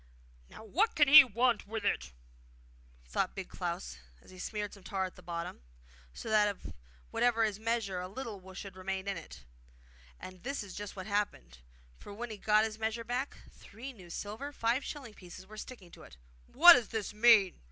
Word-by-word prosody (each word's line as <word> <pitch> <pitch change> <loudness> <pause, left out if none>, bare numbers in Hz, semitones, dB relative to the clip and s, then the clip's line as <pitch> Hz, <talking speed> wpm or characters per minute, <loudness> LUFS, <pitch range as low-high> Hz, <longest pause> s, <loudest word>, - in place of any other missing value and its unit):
'Now - - -12
what 375 - +1
can 295 -1 +5
he 300 0 +11
want 240 -2 +1
with 220 -1 -4
it?' 65 - 0 0.9
thought - - -2
Big - - -6
Klaus; 60 0 -5 0.2
and - - -18
he 185 - -13
smeared 210 +1 -4
some 200 - -13
tar 190 0 -2
at 185 - -8
the - - -14
bottom, 170 - -6 0.5
so - - -9
that 215 -1 +4
of 200 -2 -5 0.4
whatever 235 -2 +2
was 210 -2 -1
measured 220 -5 -1
a 180 - -5
little 200 -3 -8
should 195 -1 -8
remain 190 +1 -4
in 200 - -1
it. 165 - -11 0.7
And 185 -1 -10
this 275 -1 -3
is 195 -3 -10
just 205 0 -7
what 185 -2 -7
happened; 195 - -2 0.4
for - - -11
when 235 +1 -6
he 215 - -6
got 215 +1 +4
his 220 0 -6
measure 225 +1 -2
back, 250 +4 -3
three 245 +6 -10
new 185 -7 -14
silver 215 - -6
five 240 0 0
shilling 265 -7 -7
pieces 185 -1 -12
were 215 +3 -13
sticking 210 -5 -10
to - - -14
it. 65 - -14 0.3
What 345 +6 +10
does 245 -6 +1
this 220 -2 -4
mean? 215 -3 +5
210 Hz, 195 wpm, -32 LUFS, 190-235 Hz, 0.9 s, he